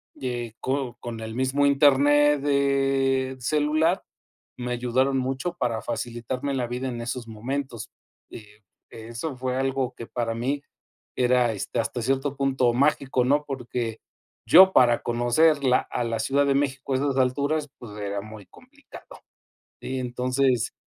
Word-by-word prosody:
de 120 -3 -5
co 130 -2 -2
con 120 -2 -6
el 110 0 -6
mismo 130 +3 +1
internet 145 +1 +4
del 135 -2 +1
celular, 155 +6 +1 0.5
me 125 0 -4
ayudaron 125 +3 +1
mucho 135 +7 -2
para 115 -2 -1
facilitarme 120 +4 -4
la 125 -2 -1
vida, 125 +2 -4
en 120 -1 -5
esos 120 0 -5
momentos, 120 +1 -5 0.4
eh, 105 -1 -13 0.3
eso 115 +6 -6
fue 130 0 -2
algo 135 -1 -1
que 115 - -8
para 115 -2 -2
mí 135 +5 -2 0.5
era, 125 -1 +3
este, 105 +3 -4
hasta 120 +1 -2
cierto 135 +3 -1
punto, 135 -3 +1
mágico, 135 -1 +1
¿no?, 145 +3 +2
porque 120 -4 -4 0.5
yo, 190 +2 +8
para 120 -2 +4
conocer 120 +6 +2
la 130 -1 +4
a - - -1
la 115 -1 -2
Ciudad 140 +6 +2
de 140 - +2
México, 135 -1 -1
a - - +2
esas 140 0 -1
alturas, 140 +4 0
pues, 110 -4 -10
era 100 0 -3
muy 110 -1 -11
complicado. - - -15 0.6
Sí, 130 0 -4
entonces, 125 0 0
130 Hz, 145 wpm, -25 LUFS, 120-140 Hz, 0.6 s, yo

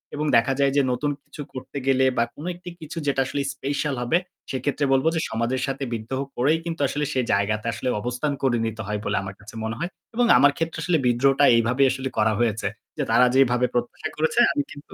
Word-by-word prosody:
এবং 150 - -2
দেখা 125 +3 +2
যায় 140 -1 +3
যে - - +6
নতুন 145 +4 0
কিছু - - -10
করতে 130 +2 -7
গেলে 130 0 +4
বা 115 - +4
কোনো 155 - -7
একটি 180 +1 -9
কিছু 155 +2 -8
যেটা 135 -1 +2
আসলে 140 - -2
special 145 +1 -2
হবে 125 +7 +2 0.3
সেক্ষেত্রে 140 +2 -1
বলব 135 +2 +2
যে 160 - +1
সমাজের 115 +3 -1
সাথে 135 0 -3
বিদ্রোহ 115 +4 -3 0.2
করেই 150 +6 +3
কিন্তু 165 -3 -4
আসলে 150 +2 -2
সে 130 - +2
জায়গাতে 105 +2 0
আসলে 130 - -3
অবস্থান 125 +5 -2
করে 125 -3 +3
নিতে 110 0 -4
হয় 105 0 -2
বলে - - 0
আমার 95 0 -7
কাছে 105 +3 -12
মনে 110 0 -3
হয়। 170 - -2 0.3
এবং 245 - +3
আমার 145 - +6
ক্ষেত্রে 165 0 -2
আসলে 175 -3 +2
বিদ্রোহটা 135 +4 +4
এইভাবেই 125 +4 +3
আসলে 130 0 -3
করা 110 0 +3
হয়েছে। 115 -2 0 0.3
যে - - 0
তারা 125 - +6
যেভাবে 125 -2 +4
প্রত্যাশা 120 +6 -2
করেছে 160 +9 +1
আমি 290 - 0
কিন্তু 145 -1 -12
130 Hz, 215 wpm, -24 LUFS, 120-145 Hz, 0.3 s, যে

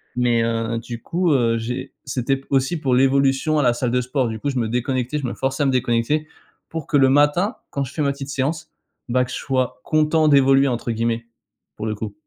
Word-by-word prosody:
Mais, 120 -2 +2
heu, 115 0 -1
du 120 0 -8
coup, 175 -1 0
heu, 115 -4 +2
j'ai 115 +2 -5
c'était 135 +2 -1
aussi 135 +5 +1
pour 135 -4 0
l'évolution 135 +3 +2
à - - +2
la 120 -2 +4
salle 120 0 -2
de 125 +1 +2
sport, 125 0 -1
du 110 -1 -5
coup, 145 - -2
je 130 - -3
me 115 - 0
déconnectais, 125 +3 -1
je 140 - -4
me 120 - -3
forçais 135 +2 -1
à - - +1
me 135 - +2
déconnecter, 130 +5 0 0.4
pour 160 -2 -5
que 145 - +2
le 135 -1 +5
matin, 150 - +3 0.2
quand 140 - -1
je 130 - -8
fais 155 - -3
ma 140 - +2
petite 140 0 -7
séance, 155 +4 -2 0.4
bah, 125 +1 +2
que 125 - -10
je - - -4
sois 130 -6 -2
«content 155 0 +2
d'évoluer», 135 -1 +5
entre 120 -2 -2
guillemets, 115 +1 -1 0.5
pour 105 - -5
le 110 - -2
coup. 105 0 -6
130 Hz, 230 wpm, -21 LUFS, 120-145 Hz, 0.5 s, le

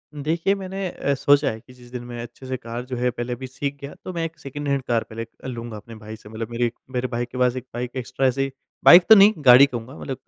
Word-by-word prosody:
देखिए, 160 +6 0
मैंने 195 0 -4
अ, 140 - -2
सोचा 145 +2 +3
है 110 - -8
कि 125 - -18
जिस 125 -1 -17
दिन 125 -1 -6
मैं 120 -1 -7
अच्छे 120 +2 -11
से 130 0 -3
कार 120 +1 -7
जो 130 0 -5
है 125 +1 +1
पहले 120 +1 -4
अभी 130 +2 -7
सीख 140 +2 -4
गया, 140 +1 -7
तो 185 - -5
मैं 170 -1 -2
एक 165 0 -7
सेकंड 145 +2 -6
हैंड 140 -1 +1
कार 120 -2 0
पहले 110 +1 -8
एक 115 - -7
अ, - - -6
लूँगा 120 -3 -6
अपने 115 +2 -12
भाई 110 0 -9
से। 110 -1 -15
मतलब 110 +1 -6
मेरे 120 +1 0
एक 120 - -3 0.2
मेरे 125 0 -1
भाई 120 -1 -2
के 120 +1 -10
पास 125 -1 +2
1 130 -1 -6
बाइक 120 +1 -4
एक्स्ट्रा 130 +2 -1
ऐसे 130 +2 0
ही 135 - -3 0.3
बाइक 175 +1 +10
तो 220 - +11
नहीं, 205 +1 +7
गाड़ी 125 +2 +9
कहूँगा, 125 +1 -7
मतलब 135 -2 -5
125 Hz, 285 wpm, -23 LUFS, 120-140 Hz, 0.3 s, तो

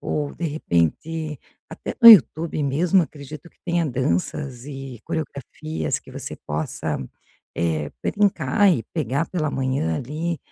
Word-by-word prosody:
ou, 145 -1 -2
de 170 - -4
repente, 155 - -1 0.3
até - - -7
no 235 - +11
YouTube 165 -6 +7
mesmo, 170 +7 +3
acredito 150 +1 -9
que - - -37
tenha 170 -1 +1
danças 130 - -2
e 135 -4 -8
coreografias 155 0 -4
que - - -15
você - - -6
possa, 75 +1 -2 0.6
eh, 80 -3 -1
brincar 200 -2 +2
e 135 - 0
pegar 145 -1 -1
pela 155 -5 -1
manhã, 130 - -1
ali, 155 - -3
145 Hz, 130 wpm, -23 LUFS, 130-165 Hz, 0.6 s, no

